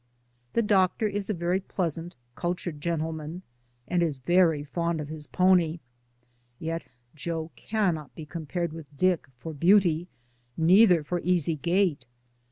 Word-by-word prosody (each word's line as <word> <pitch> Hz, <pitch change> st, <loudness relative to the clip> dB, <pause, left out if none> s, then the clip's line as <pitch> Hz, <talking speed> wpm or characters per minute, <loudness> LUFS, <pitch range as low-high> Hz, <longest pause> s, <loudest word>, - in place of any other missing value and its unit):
The 230 Hz, -, +2 dB
doctor 205 Hz, +1 st, +3 dB
is 205 Hz, 0 st, -3 dB
a -, -, +2 dB
very 175 Hz, +2 st, 0 dB
pleas 180 Hz, -4 st, -2 dB
ant, 170 Hz, +1 st, -8 dB, 0.2 s
cultured 175 Hz, -1 st, -3 dB
gentleman, 160 Hz, +1 st, -3 dB, 0.4 s
and 175 Hz, -1 st, +1 dB
is 160 Hz, -5 st, 0 dB
very 165 Hz, +1 st, +3 dB
fond 170 Hz, +2 st, -2 dB
of 150 Hz, -1 st, -5 dB
his 155 Hz, -1 st, -6 dB
pony, 180 Hz, -3 st, +3 dB, 0.8 s
yet 165 Hz, +3 st, -4 dB, 0.3 s
Joe 160 Hz, +1 st, -4 dB
cannot 180 Hz, -, -1 dB
be 160 Hz, -, -8 dB
compared 170 Hz, +1 st, -4 dB
with 160 Hz, -3 st, -9 dB
Dick 185 Hz, -2 st, +2 dB
for 160 Hz, +6 st, -7 dB
beauty, 175 Hz, 0 st, +4 dB, 0.5 s
neither 180 Hz, 0 st, +6 dB
for 175 Hz, +4 st, -2 dB
easy 170 Hz, -3 st, +1 dB
gait. 170 Hz, -3 st, +1 dB
170 Hz, 140 wpm, -27 LUFS, 160-180 Hz, 0.8 s, neither